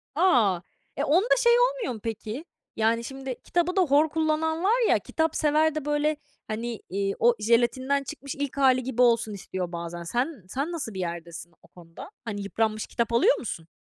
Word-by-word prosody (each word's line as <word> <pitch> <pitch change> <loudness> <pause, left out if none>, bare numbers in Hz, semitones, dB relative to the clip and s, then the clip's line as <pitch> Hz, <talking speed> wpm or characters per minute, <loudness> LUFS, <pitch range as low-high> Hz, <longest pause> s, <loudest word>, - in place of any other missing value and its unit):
A! 240 - +3 0.4
E, 285 - 0
onda 360 - +4
şey 475 -1 +4
olmuyor - - +1
mu, 220 - -8
peki? 225 +6 -5 0.3
Yani, 225 +1 +1
şimdi 270 0 -6
kitabı 350 +1 0
da 380 - +4
hor 300 -1 +4
kullanan 320 +1 0
var 460 +3 +3
ya, - - +4
kitapsever 315 -1 +1
de, 305 -2 -3
böyle, 295 0 +1 0.3
hani, 230 +1 -4
iii, 195 +1 -1
o 240 0 +4
jelatinden 245 +5 +2
çıkmış 280 0 -7
ilk 280 -1 -4
hâli 260 -2 +4
gibi 250 -1 -1
olsun 235 -3 +3
istiyor 185 -2 -5
bazen. 170 0 -6
Sen 245 - -2
sen 280 +6 -2
nasıl 310 -10 -4
bir 190 - -6
yerdesin 170 -1 -6
o - - -20
konuda? 170 - -12
Hani, 205 -3 -4
yıpranmış 215 +1 -1
kitap 235 -1 -2
alıyor 400 - +4
musun? 165 -8 -6
255 Hz, 180 wpm, -26 LUFS, 215-310 Hz, 0.4 s, onda